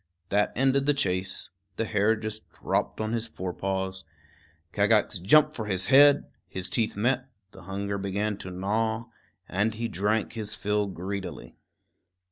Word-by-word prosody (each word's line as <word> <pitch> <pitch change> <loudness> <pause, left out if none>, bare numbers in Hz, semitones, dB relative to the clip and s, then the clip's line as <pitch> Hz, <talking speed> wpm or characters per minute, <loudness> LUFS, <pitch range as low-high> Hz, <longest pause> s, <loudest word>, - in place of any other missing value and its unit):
That 105 +1 +2
ended 135 +2 +2
the 145 - +4
chase. 95 -7 -1 0.2
The 115 - -1
hare 105 +1 +2
just 110 0 -6
dropped - - -2
on 110 0 -1
his 115 0 -1
fore 95 -4 -5
paws. 95 0 -3 0.7
Kagax - - +3
jumped 150 - +5
for 110 -6 -5
his 95 -2 0
head; 145 +1 +8 0.2
his 95 0 -5
teeth 115 -3 +1
met; 125 +5 0 0.2
the 95 - -13
hunger 100 +1 -3
began 100 +2 -1
to 95 - -7
gnaw, 110 +5 -1 0.4
and 105 +4 0
he 115 +1 -2
drank 105 +3 0
his 110 -2 -3
fill 105 0 0
greedily. 95 +1 -6
105 Hz, 150 wpm, -27 LUFS, 95-115 Hz, 0.7 s, head